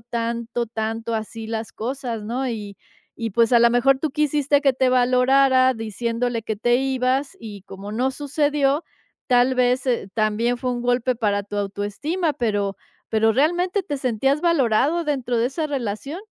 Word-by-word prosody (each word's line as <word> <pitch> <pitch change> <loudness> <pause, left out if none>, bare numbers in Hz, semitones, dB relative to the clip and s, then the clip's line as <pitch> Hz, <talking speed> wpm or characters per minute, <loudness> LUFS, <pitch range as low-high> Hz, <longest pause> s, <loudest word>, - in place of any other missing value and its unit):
tanto, 235 0 -3
tanto 225 +1 -3
así 220 0 -5
las 225 -1 -4
cosas?, 240 -2 -4
¿no?, 250 +4 -2
y 205 -4 -6 0.5
y, 225 - -1
pues, 230 +3 +2
a 240 - +7
lo 235 0 +6
mejor 245 +3 +3
tú 310 +2 -2
quisiste 290 -1 +1
que 275 -2 +4
te 260 0 +1
valorara 255 +1 +4
diciéndole 230 +2 -2
que 220 -1 -3
te 240 +3 +2
ibas 265 +1 0
y, 210 -3 -9
como 195 +1 -9
no 250 +4 0
sucedió, 290 +1 0 0.4
tal 250 0 +3
vez, 250 0 +2
eh, 240 -6 0
también 225 +3 +1
fue 250 +1 -2
un 240 - -3
golpe 245 +1 +1
para 205 -3 0
tu 205 +1 -7
autoestima, 205 - -2
pero 205 -6 -1 0.3
pero, 220 0 +3
¿realmente 350 - +1
te 295 -6 -4
sentías 270 +3 0
valorado 305 -1 +2
dentro 260 -5 -1
de 230 +1 +2
esa 310 +4 -3
relación? 275 - -4
245 Hz, 165 wpm, -22 LUFS, 225-270 Hz, 0.5 s, a